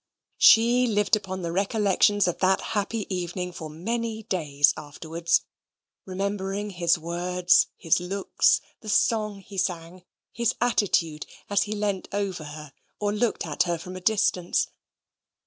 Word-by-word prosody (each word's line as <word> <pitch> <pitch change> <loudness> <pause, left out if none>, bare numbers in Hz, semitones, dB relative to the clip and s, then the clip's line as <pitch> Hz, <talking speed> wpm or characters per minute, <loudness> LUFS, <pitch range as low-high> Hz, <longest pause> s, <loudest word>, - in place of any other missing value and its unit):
She 240 +2 +6
lived 210 -2 +2
upon 190 -3 -5
the 170 - -2
recollections 200 +1 +2
of 175 - -2
that 190 0 +3
happy 210 +1 -1
evening 180 0 -4
for 160 -3 -8
many 220 +7 -3
days 145 -7 +2
afterwards, 160 +3 -1 0.6
remembering 195 +1 -3
his 170 -2 +2
words; 175 +2 +2
his 165 -1 +2
looks; 190 +3 +1 0.2
the 215 - -9
song 210 -1 +1
he 195 0 -7
sang; 175 0 -3 0.3
his 235 0 0
attitude, 180 -10 +1 0.2
as 200 -1 +3
he - - -1
leant 205 -2 -2
over 195 -5 -3
her 150 -1 -9 0.3
or 205 0 0
looked 215 +1 0
at 150 -3 -2
her 170 - 0
from 185 +2 -9
a 185 - -7
distance. 185 -3 +1
190 Hz, 140 wpm, -25 LUFS, 170-205 Hz, 0.6 s, She